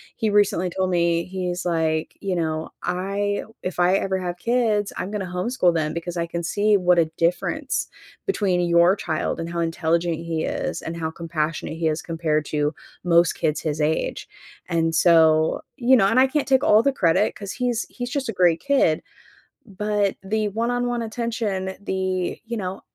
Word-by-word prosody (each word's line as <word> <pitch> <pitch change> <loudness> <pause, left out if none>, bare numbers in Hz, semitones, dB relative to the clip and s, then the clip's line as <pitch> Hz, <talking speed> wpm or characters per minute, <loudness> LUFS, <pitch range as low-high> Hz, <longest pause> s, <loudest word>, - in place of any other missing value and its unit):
he 220 -2 0
recently 200 -3 +2
told 185 +1 -1
me, 170 -1 +2
he's 180 -1 -3
like, 160 -2 -1
you 195 -2 -1
know, 160 -1 -2
"I 200 +3 -1 0.2
if 185 -1 -4
I 180 +2 +4
ever 190 -1 -1
have 180 -1 -4
kids, 220 -2 +1
I'm 190 - -4
gonna 210 -2 -2
homeschool 180 +1 +1
them 155 -1 0
because 170 +1 -5
I 170 - 0
can 170 0 -4
see 205 +4 +2
what 180 -1 +3
a 165 - +4
difference 170 +1 0 0.4
between 200 - +1
your 170 +2 +4
child 160 -5 -2
and 165 0 -4
how 170 - -3
intelligent 165 0 0
he 165 -1 -3
is - - -3
and 170 +1 -5
how 160 -1 -2
compassionate 160 -1 -3
he 165 - 0
is 155 0 -1
compared 160 -2 -1
to 150 +1 -1 0.3
most 170 -1 +4
kids 150 0 -1
his 155 -1 -2
age." 155 +1 -1 0.4
And 165 -1 0
so 160 -2 +4 0.2
you 255 +1 +5
know, 195 -6 +4
and 230 +6 +3
I 265 - +6
can't 285 0 -1
take 265 +1 +3
all 220 -4 +5
the 275 - +3
credit 190 -3 +2
‘cause 200 -2 -6
he's 245 -2 -1
he's 245 -1 -5
just 270 0 -2
a 225 - -2
great 175 -3 +3
kid. 270 - +2 0.7
But 205 0 -1
the 215 +2 -1
one-on-one 240 +2 -1
attention, 220 -5 -3
the, 185 -2 -2
you 235 +1 -4
know 190 -2 -4
180 Hz, 180 wpm, -23 LUFS, 165-210 Hz, 0.7 s, I